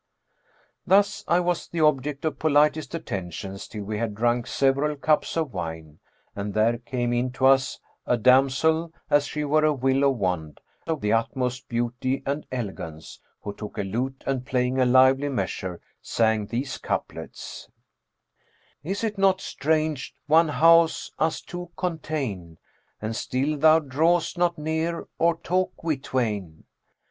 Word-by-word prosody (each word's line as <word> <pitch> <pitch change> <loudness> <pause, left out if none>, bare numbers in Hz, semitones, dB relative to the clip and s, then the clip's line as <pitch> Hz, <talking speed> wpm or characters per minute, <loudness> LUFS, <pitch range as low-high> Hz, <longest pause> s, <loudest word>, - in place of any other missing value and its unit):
Thus 200 +2 +3
I 170 - +4
was 175 -1 -1
the 170 - -3
object 150 -1 +1
of 150 -3 -2
politest 150 +1 +2
attentions 95 - -5
till 105 -2 -7
we 105 +1 -4
had 110 -3 -2
drunk 120 +2 +1
several 140 +2 +1
cups 155 +3 +1
of 155 -5 -1
wine 80 -3 -6 0.4
and 100 0 -4
there 115 +2 +2
came 120 0 -2
into 125 +2 0
us 135 0 +4 0.3
a 125 - +3
damsel 135 +7 +3 0.2
as 145 0 +4
she 150 - -3
were 155 +2 +2
a 155 - +4
willow 135 +1 +2
wand 90 - -2 0.3
of 160 -3 -2
the 105 +1 +1
utmost 125 +2 -1
beauty 125 +3 -1
and 140 +2 -3
elegance, 95 -10 -6 0.2
who 100 - -5
took 105 0 -9
a 105 - -1
lute 125 +7 -3
and 130 -2 -1
playing 125 0 0
a 130 - +4
lively 130 +3 +5
measure, 95 -9 -3 0.2
sang 110 -2 +1
these 130 +5 -3
couplets, - - -5 1.1
'Is 195 +7 -3
it 210 -3 -2
not 190 -1 +4
strange 155 -4 -1
one 160 +3 +5
house 165 +2 +4
us 160 0 0
two 175 -1 -8
contain 140 - -3 0.2
* - - -42
And 110 +1 -2
still 135 +6 -1
thou 155 +2 +6
draw'st 160 +5 +1
not 175 -1 +1
near, 160 +2 -2
or 165 0 +3
talk 185 +1 -2
we 160 -2 +1
twain? 105 -11 -3
135 Hz, 150 wpm, -25 LUFS, 115-160 Hz, 1.1 s, thou